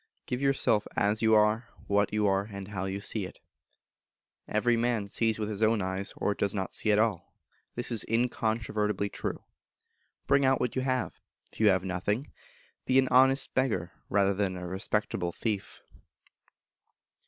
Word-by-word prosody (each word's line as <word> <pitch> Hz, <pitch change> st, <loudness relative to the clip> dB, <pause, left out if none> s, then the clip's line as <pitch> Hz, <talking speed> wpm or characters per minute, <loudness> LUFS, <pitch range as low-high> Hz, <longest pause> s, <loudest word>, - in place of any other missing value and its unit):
Give 125 Hz, +1 st, -3 dB
yourself 135 Hz, -6 st, +2 dB
as 105 Hz, +2 st, +1 dB
you 110 Hz, -1 st, +5 dB
are, 110 Hz, +2 st, +3 dB, 0.2 s
what 100 Hz, 0 st, +1 dB
you 105 Hz, 0 st, +1 dB
are, 95 Hz, 0 st, +2 dB
and 100 Hz, 0 st, -7 dB
how 95 Hz, -2 st, -3 dB
you 95 Hz, +1 st, -3 dB
see 105 Hz, +1 st, -1 dB
it. -, -, -10 dB, 1.1 s
Everyman 115 Hz, 0 st, +1 dB
sees 110 Hz, +2 st, 0 dB
with 105 Hz, -1 st, -2 dB
his 105 Hz, -1 st, -5 dB
own 110 Hz, 0 st, +3 dB
eyes, 95 Hz, +1 st, -3 dB
or 105 Hz, -, 0 dB
does 100 Hz, 0 st, -1 dB
not 95 Hz, -2 st, -3 dB
see 110 Hz, -, +1 dB
at 105 Hz, -, +4 dB
all. 105 Hz, -6 st, 0 dB, 0.4 s
This 120 Hz, +1 st, -2 dB
is 115 Hz, -, 0 dB
incontrovertibly 110 Hz, -3 st, 0 dB
true. -, -, -5 dB, 0.8 s
Bring 140 Hz, +1 st, +3 dB
out 135 Hz, 0 st, +3 dB
what 125 Hz, -, -1 dB
you 130 Hz, -, 0 dB
have. 130 Hz, -1 st, -2 dB, 0.3 s
If -, -, -15 dB
you 110 Hz, -, +5 dB
have 95 Hz, -2 st, +4 dB
nothing, 100 Hz, +8 st, -2 dB, 0.6 s
be 130 Hz, -, +3 dB
an 130 Hz, -1 st, +4 dB
honest 135 Hz, +2 st, +4 dB
beggar 110 Hz, -10 st, 0 dB, 0.2 s
rather 100 Hz, -1 st, +3 dB
than 95 Hz, -2 st, -1 dB
a 90 Hz, -, -6 dB
respectable 95 Hz, -1 st, -2 dB
thief. 105 Hz, +1 st, -4 dB
105 Hz, 165 wpm, -29 LUFS, 100-120 Hz, 1.1 s, you